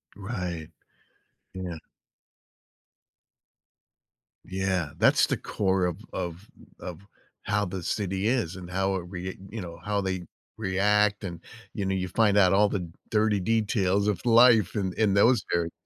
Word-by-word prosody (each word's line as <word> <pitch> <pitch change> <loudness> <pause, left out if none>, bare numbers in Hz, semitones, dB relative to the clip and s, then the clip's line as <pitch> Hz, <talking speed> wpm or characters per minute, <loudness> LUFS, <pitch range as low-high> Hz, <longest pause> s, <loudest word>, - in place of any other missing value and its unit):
Right. 90 -6 -5 0.9
Yeah. 90 -3 -5 2.7
Yeah, 95 -4 -1
that's - - +4
the - - 0
core 95 -2 0
of 90 0 -2 0.2
of 90 +2 -5 0.3
of 90 -1 -7 0.4
how 105 0 0
the 90 -1 -5
city 95 +1 -1
is 115 -8 0
and 90 -1 -9
how 95 +1 0
it 90 -2 -4
rea 95 0 -6
you 110 -1 -6
know, 85 -1 -8
how 105 -1 0
they 95 -2 -3 0.3
react 105 +1 +2
and, 85 -3 -5 0.3
you 100 - -3
know, 95 - 0
you 95 0 -2
find 105 0 +2
out 95 -1 +5
all 105 +1 +4
the 90 -3 -3 0.2
dirty 105 -2 +2
details 100 -1 +1
of 105 - -1
life 115 -4 +6
in 95 -3 -1
in 105 -3 +3
those 115 +2 +4
areas. 85 -1 0
95 Hz, 145 wpm, -27 LUFS, 90-105 Hz, 2.7 s, life